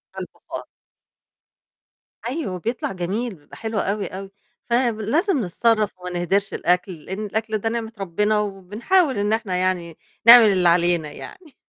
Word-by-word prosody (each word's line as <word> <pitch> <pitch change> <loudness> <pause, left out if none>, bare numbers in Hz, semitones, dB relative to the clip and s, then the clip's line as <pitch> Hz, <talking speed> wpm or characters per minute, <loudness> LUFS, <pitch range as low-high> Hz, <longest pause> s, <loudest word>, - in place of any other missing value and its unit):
على - - -5
البُخار. - - -9 1.6
أيوه، 245 - -3
بيطلع 230 +4 -3
جميل، 195 +5 -3
بيبقى 145 -1 -16
حلو 220 -1 -3
أوي، 200 +1 -1
أوي 195 +1 -8 0.4
فب 235 -2 +1
لازم 300 - +1
نتصرّف 215 +3 +1
وما 180 0 -6
نهدِرش 195 +3 0
الأكل، 180 +2 +1
لإن 195 +3 -5
الأكل 220 +1 -2
ده 225 +2 -2
نعمة 225 -1 -4
ربنا 210 +3 0
وبنحاول 210 - 0
إن 205 +1 +1
إحنا 220 -5 -1
يعني 180 -3 -1 0.3
نعمل 235 0 +11
اللي 185 -4 +4
علينا 170 -3 +2
يعني. 310 - -12
205 Hz, 145 wpm, -22 LUFS, 185-230 Hz, 1.6 s, نعمل